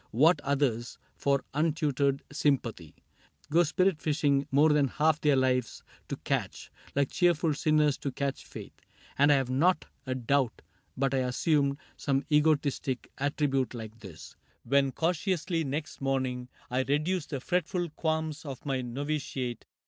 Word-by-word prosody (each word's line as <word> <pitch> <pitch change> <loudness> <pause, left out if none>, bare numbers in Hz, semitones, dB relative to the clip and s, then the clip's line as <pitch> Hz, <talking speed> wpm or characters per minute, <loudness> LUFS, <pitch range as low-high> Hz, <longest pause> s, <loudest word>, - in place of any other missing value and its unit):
What 150 +6 +4
others, 135 -5 -1 0.2
for 140 -1 0
untutored 145 -3 +1
sympathy. 125 - -1 0.6
Go 170 +3 +5
spirit 175 +1 +1
fishing 145 -2 +1
more 145 +3 +5
than 150 -2 +3
half 155 +3 +1
their 145 -2 +4
lives 130 -2 0 0.2
To - - -3
catch - - -3
— - - -23
like 140 -1 +1
cheerful 170 -3 +2
sinners 150 -1 +2
to 140 - -3
catch 140 +1 -3
faith; - - -10 0.4
And 145 +1 +5
I - - +6
have 135 -2 0
not 160 +6 +2 0.2
a 130 - -1
doubt 130 -1 0 0.3
but 135 0 +1
I 135 - +2
assumed 140 +3 +1 0.2
Some 140 -1 0
egotistic 150 -4 +1
attribute 140 -2 0
like 110 -1 -8
this 90 -7 -11 0.3
When, 135 +2 +2
cautiously, 170 +1 0
next 145 +2 -4
morning 130 -2 -1 0.2
I 125 - +1
reduced 155 +5 0
The 140 - -3
fretful 175 +2 -1
qualms 160 -1 -2
of 140 -2 -8
my 135 -2 -1
novitiate. 130 -1 -3
140 Hz, 145 wpm, -29 LUFS, 130-155 Hz, 0.6 s, I